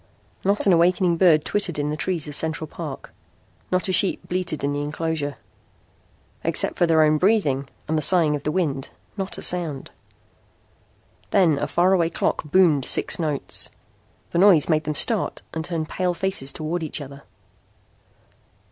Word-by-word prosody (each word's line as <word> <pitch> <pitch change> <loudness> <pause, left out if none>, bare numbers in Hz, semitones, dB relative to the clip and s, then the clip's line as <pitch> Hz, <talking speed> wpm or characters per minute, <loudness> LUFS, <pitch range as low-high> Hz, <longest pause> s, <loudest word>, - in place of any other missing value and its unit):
Not 200 +2 +1
an 195 - +4
awakening 175 +1 +2
bird 160 -4 +4
twittered 190 -6 -2
in 145 0 -2
the - - -2
trees 165 -1 -2
of 150 - -6
Central 160 +1 0
Park. - - -8 0.6
Not 185 +1 0
a - - -1
sheep 190 +2 +3
bleated 180 -4 -3
in 140 0 -1
the 145 - -3
inclosure. 145 -1 -3 1.1
Except - - +1
for 175 - +1
their 160 -1 +4
own 155 0 +2
breathing 150 - +1 0.2
and 160 - -1
the - - -3
sighing 160 -2 +5
of 145 - -5
the 150 - -2
wind, 150 -6 -2 0.3
not 195 -2 -5
a - - -2
sound! 165 -6 -1 1.4
Then 165 -7 +2
a - - -2
faraway 175 -1 +2
clock 170 - -2
boomed 150 -4 +3
six - - +3
notes. 150 -4 -2 0.6
The 170 - 0
noise 185 -7 +5
made 155 -1 +1
them 150 0 -3
start 220 - +2
and 160 - -4
turn 165 -2 -3
pale 180 +2 -2
faces 190 -8 -1
toward 160 +5 -4
each 160 -1 -4
other. 140 -1 -10
160 Hz, 165 wpm, -22 LUFS, 150-180 Hz, 1.4 s, sighing